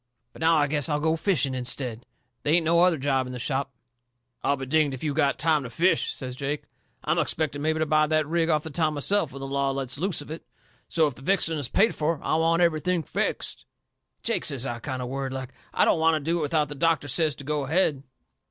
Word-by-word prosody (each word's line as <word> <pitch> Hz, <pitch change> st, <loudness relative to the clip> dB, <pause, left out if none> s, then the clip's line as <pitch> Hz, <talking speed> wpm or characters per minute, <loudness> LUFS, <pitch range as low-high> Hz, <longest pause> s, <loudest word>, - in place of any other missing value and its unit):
But -, -, -13 dB
now 165 Hz, +1 st, +4 dB
I 150 Hz, -2 st, +4 dB
guess 145 Hz, +1 st, 0 dB
I'll 150 Hz, -1 st, +1 dB
go 160 Hz, +1 st, +1 dB
fishing 160 Hz, -6 st, +1 dB
instead. 125 Hz, -2 st, -3 dB, 0.3 s
They 150 Hz, +2 st, +2 dB
ain't 170 Hz, -2 st, +2 dB
no 170 Hz, +1 st, +4 dB
other 180 Hz, -2 st, +4 dB
job 135 Hz, -2 st, 0 dB
in 125 Hz, -, -7 dB
the -, -, -5 dB
shop." 135 Hz, +2 st, -2 dB, 0.7 s
"I'll 140 Hz, -, +2 dB
be 135 Hz, -1 st, -6 dB
dinged 145 Hz, 0 st, +2 dB
if 130 Hz, -, -10 dB
you've 145 Hz, -3 st, -1 dB
got 140 Hz, -3 st, +2 dB
time 160 Hz, -2 st, +2 dB
to 125 Hz, -, -6 dB
fish," 175 Hz, +9 st, +2 dB
says 125 Hz, -2 st, -6 dB
Jake. 145 Hz, +2 st, -3 dB, 0.4 s
"I'm -, -, +1 dB
expecting 150 Hz, -2 st, -1 dB
mebby 160 Hz, +1 st, +1 dB
to 155 Hz, -, +1 dB
buy 155 Hz, 0 st, +3 dB
that 155 Hz, 0 st, +2 dB
rig 165 Hz, +2 st, 0 dB
off 155 Hz, -2 st, +2 dB
the 160 Hz, -, -7 dB
town 155 Hz, 0 st, 0 dB
myself 165 Hz, +2 st, 0 dB
when 135 Hz, +1 st, -9 dB
the -, -, -4 dB
law 140 Hz, 0 st, 0 dB
lets 135 Hz, 0 st, -3 dB
loose 190 Hz, +2 st, 0 dB
of 145 Hz, +1 st, -8 dB
it. 160 Hz, -, -6 dB, 0.5 s
So 165 Hz, -2 st, +3 dB
if 145 Hz, -, -1 dB
the 130 Hz, -, -15 dB
fixing 165 Hz, -1 st, +2 dB
is 135 Hz, -4 st, -3 dB
paid 220 Hz, +4 st, +3 dB
fur, 155 Hz, +1 st, -1 dB
I -, -, +1 dB
want 165 Hz, +2 st, +3 dB
everything 170 Hz, +1 st, +1 dB
fixed." -, -, -3 dB, 0.6 s
"Jake," -, -, 0 dB
says 135 Hz, -2 st, 0 dB
I, 120 Hz, -2 st, -3 dB
kind 130 Hz, +1 st, -4 dB
of -, -, -4 dB
worried 135 Hz, 0 st, -3 dB
like, 130 Hz, -1 st, -6 dB, 0.2 s
"I -, -, +3 dB
don't -, -, +3 dB
want 160 Hz, 0 st, +4 dB
to -, -, 0 dB
do 170 Hz, -, +1 dB
it -, -, -2 dB
without 150 Hz, -1 st, +1 dB
that 145 Hz, -2 st, -8 dB
doctor 165 Hz, -3 st, +2 dB
says 155 Hz, +1 st, +1 dB
to 140 Hz, -, -10 dB
go 145 Hz, 0 st, -2 dB
ahead." 155 Hz, -2 st, +2 dB
150 Hz, 245 wpm, -26 LUFS, 135-160 Hz, 0.7 s, now